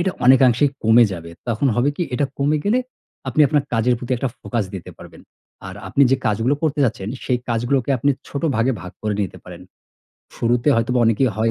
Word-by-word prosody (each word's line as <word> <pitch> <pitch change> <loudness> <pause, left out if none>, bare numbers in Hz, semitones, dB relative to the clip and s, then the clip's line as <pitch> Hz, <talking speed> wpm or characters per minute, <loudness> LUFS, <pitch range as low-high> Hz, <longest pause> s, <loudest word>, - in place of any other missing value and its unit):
এটা 190 +2 +1
অনেকাংশেই 130 +1 +5
কমে 115 +2 +6
যাবে। 85 -1 -8 0.2
তখন 115 +5 0
হবে 120 +3 +2
কি, - - -1
এটা 140 +3 +1
কমে 145 +2 +1
গেলে 245 +5 +3 0.5
আপনি 130 - 0
আপনার 150 -3 +2
কাজের 120 +2 +2
প্রতি 125 +1 -4
একটা 130 +2 -2
focus 115 -4 -2
দিতে 95 - -8
পারবেন। - - -13 0.5
আর 95 - -8
আপনি 140 +9 +2
যে 135 - +4
কাজগুলো 115 +6 +1
করতে 150 -2 0
যাচ্ছেন, 105 -4 -2 0.2
সেই 125 -2 0
কাজগুলোকে 120 +3 0
আপনি 140 +4 +2 0.2
ছোট 140 - -5
ভাগে 125 +3 +2
ভাগ 90 - -9
করে 105 -1 -1
নিতে 95 - -6
পারেন। - - -11 0.7
শুরুতে 120 +3 +1
হয়তোবা 120 +2 +1
অনেকেরই 115 +2 +2
হয় 115 +1 +1
120 Hz, 195 wpm, -20 LUFS, 115-140 Hz, 0.7 s, কমে